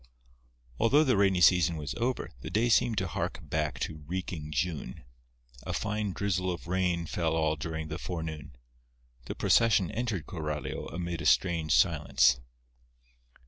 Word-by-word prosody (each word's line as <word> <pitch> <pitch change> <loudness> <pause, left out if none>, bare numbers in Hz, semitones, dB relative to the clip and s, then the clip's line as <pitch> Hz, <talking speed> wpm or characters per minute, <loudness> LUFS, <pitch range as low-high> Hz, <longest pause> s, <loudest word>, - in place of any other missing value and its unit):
Although 145 +7 +5
the 130 -6 +2
rainy 95 -2 +3
season 85 -2 +5
was 75 -1 -4
over, 125 +2 -2
the - - -6
day 115 +3 +1
seemed 120 -1 +3
to 95 -1 0
hark - - -3
back 75 +1 -2
to 75 -1 -4
reeking 90 -3 -4
June. 75 -4 -3 0.6
A - - -5
fine 105 -1 -2
drizzle 95 -1 -1
of 85 - -6
rain 90 -1 0
fell 80 0 -1
all 80 -1 +1
during 80 +1 -5
the 80 +2 -5
forenoon. 80 -7 -6 0.7
The - - -5
procession 110 -6 +3
entered 110 -6 -2
Coralio 75 -5 -4
amid 85 -1 -4
a 75 - 0
strange 80 -3 +3
silence. 75 -7 +3
85 Hz, 145 wpm, -29 LUFS, 80-95 Hz, 0.7 s, Although